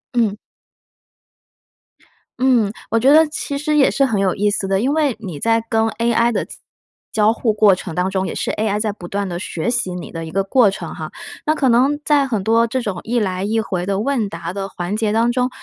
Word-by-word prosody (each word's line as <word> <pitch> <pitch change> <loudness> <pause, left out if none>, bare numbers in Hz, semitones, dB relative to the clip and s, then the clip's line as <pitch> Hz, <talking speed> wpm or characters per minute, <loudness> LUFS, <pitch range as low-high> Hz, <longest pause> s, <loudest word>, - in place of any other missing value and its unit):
嗯。 220 -4 +1 2.0
嗯， 245 -6 +3 0.2
我 225 - +3
觉 260 +5 +4
得 315 +2 +7
其 290 -2 -4
实 300 +1 -1
也 275 - +5
是 275 - +2
很 225 -6 0
有 195 -2 +1
意 205 +1 +1
思 200 -1 -2
的。 195 0 +1
因 260 +7 +1
为 300 -6 +1
你 180 -9 -7
在 225 +4 +2
跟 225 -1 +2
AI 235 +1 +1
的 - - -1
交 - - -11 0.6
交 215 0 +3
互 230 -1 0
过 210 -2 +5
程 180 -2 -5
当 180 +1 0
中， 190 0 -1
也 - - -5
是 - - -2
AI 210 -1 -1
在 215 0 -1
不 185 -4 -10
断 200 +2 -2
地 175 -1 -4
学 175 +4 -3
习 215 -7 -1
你 180 - -7
的 165 -1 -5
一 160 - -7
个 195 +2 0
过 215 +2 +4
程 175 -4 -6
哈。 155 -2 -7 0.4
那 310 - +3
可 275 - +1
能 265 +5 +3
在 285 -2 +3
很 220 -7 -2
多 230 +2 +3
这 260 +3 -2
种 205 -7 -3
一 240 +2 0
来 185 -3 -2
一 220 +3 0
回 185 -4 -3
的 195 -1 0
问 235 -3 0
答 170 -1 -6
的 195 0 -4
环 180 +1 -4
节 215 -1 0
当 230 +2 +2
中， 250 0 0
215 Hz, 255 characters per minute, -19 LUFS, 195-240 Hz, 2.0 s, 得